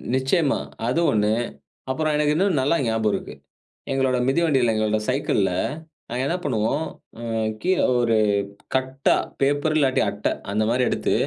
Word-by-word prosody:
நிச்சயமா. 135 +3 +1 0.3
அது 125 +7 +1
ஒண்ணு, 105 -1 +2 0.6
அப்புறம் 155 +3 0
எனக்கு 150 0 +2
இன்னும் 180 -3 +2
நல்லா 140 +5 +2
ஞாபகம் 110 -2 +1
இருக்கு. - - -4 0.6
எங்களோட 135 -1 +1
மிதிவண்டியில 135 -6 +2
எங்களோட 110 0 +1
சைக்கிள்ல 130 -7 +1 0.6
நாங்க 125 +2 -2
என்ன 170 - 0
பண்ணுவோம்? 130 +4 0 0.4
அ - - -8 0.4
கீழ 185 +1 +1 0.2
ஒரு 115 -2 +2 0.6
கட்டா, 130 +1 +1 0.3
பேப்பர் 145 +3 +1
இல்லாட்டி 135 -3 +2
அட்ட, - - -10 0.3
அந்த 105 +2 +1
மாரி 125 +2 +2
எடுத்து - - 0
130 Hz, 140 wpm, -23 LUFS, 115-150 Hz, 0.6 s, ஒண்ணு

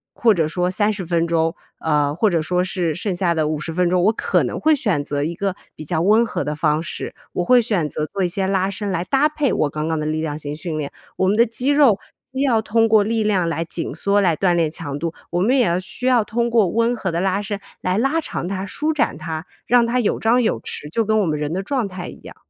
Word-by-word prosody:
或 225 -2 +4
者 160 -4 +1
说 180 +2 0
30 205 -1 0
分 170 0 +1
钟， 165 0 +1 0.2
呃， 150 -2 +1
或 210 +7 +2
者 170 -3 +1
说 180 +3 0
是 180 -3 -1
剩 185 +3 -3
下 175 -1 +1
的 155 -2 0
50 155 +1 -3
分 180 0 +2
钟， 180 0 +2
我 215 +4 +4
可 - - +1
能 - - -3
会 315 0 +4
选 205 - 0
择 145 0 -2
一 165 +3 -2
个 195 +1 -2 0.2
比 155 - -8
较 160 +1 0
温 215 +6 +4
和 - - -3
的 150 - -2
方 150 +1 +1
式。 - - -6 0.2
我 180 - -1
会 245 +5 +5
选 195 -9 0
择 155 - -3
做 195 +4 -3
一 - - +2
些 190 +2 -1
拉 190 0 +1
伸 200 0 -4
来 175 -2 -1
搭 275 +9 +3
配 300 -3 0
我 150 - +1
刚 155 +2 -3
刚 160 -1 -1
的 150 - -2
力 155 +1 -1
量 150 -2 -3
型 145 -1 -5
训 160 0 -4
练， 145 -2 -4 0.3
我 185 - +2
们 200 - +3
的 235 +2 +5
肌 250 +4 -1
肉 280 -8 +5 0.3
既 265 - -3
要 235 -5 +3
通 225 +1 +2
过 215 -2 +5
力 220 +1 0
量 190 -5 +1
来 165 0 -2
紧 165 0 -4
缩、 200 0 +2
来 170 -5 +2
锻 185 -2 +2
炼 165 -3 +2
强 145 -3 -5
度， 165 0 -3 0.2
我 175 - 0
们 250 +8 +3
也 245 - +4
要 175 -1 +1
需 185 +6 -6
要 250 -4 +4
通 235 +2 -1
过 230 -4 +3
温 230 +6 +1
和 190 -4 -3
的 170 - -1
拉 195 +1 0
伸 205 0 -4 0.2
来 185 +2 0
拉 275 +7 +1
长 175 - -4
它、 195 0 -3
舒 305 +10 -1
展 280 - 0
它， 160 +1 -5 0.2
让 245 -1 +4
它 250 +2 +1
有 220 - 0
张 240 +3 +3
有 225 - 0
弛， 150 - -6
就 230 - +1
跟 220 0 +1
我 - - +1
们 155 -3 -1
人 150 0 -2
的 190 +2 -2
状 250 -2 -1
态 185 -1 -7
一 - - -10
样。 - - -11
185 Hz, 285 characters per minute, -21 LUFS, 165-225 Hz, 0.3 s, 会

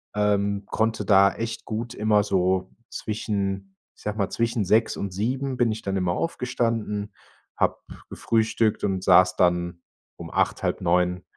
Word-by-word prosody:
Ähm, 100 -1 +1
konnte 110 0 0
da 100 -1 +5
echt 115 0 -5
gut 115 +2 -4
immer 105 -1 +2
so 95 -1 0 0.2
zwischen, 100 -3 -3 0.2
ich - - -19
sage 105 +1 -3
mal 100 -2 0
zwischen 115 -3 -1
6 110 +4 +3
und 100 -2 -4
7 130 +6 -2
bin 120 -3 +2
ich 110 - -4
dann 95 0 -1
immer 90 -2 0
aufgestanden, 115 - -2 0.4
habe - - +1 0.3
gefrühstückt 110 -1 0
und 95 -2 -1
saß 90 0 +5
dann 85 -1 +1 0.4
um - - -9
8, - - 0
halb - - 0
9 90 +1 +1
105 Hz, 155 wpm, -25 LUFS, 95-115 Hz, 0.4 s, da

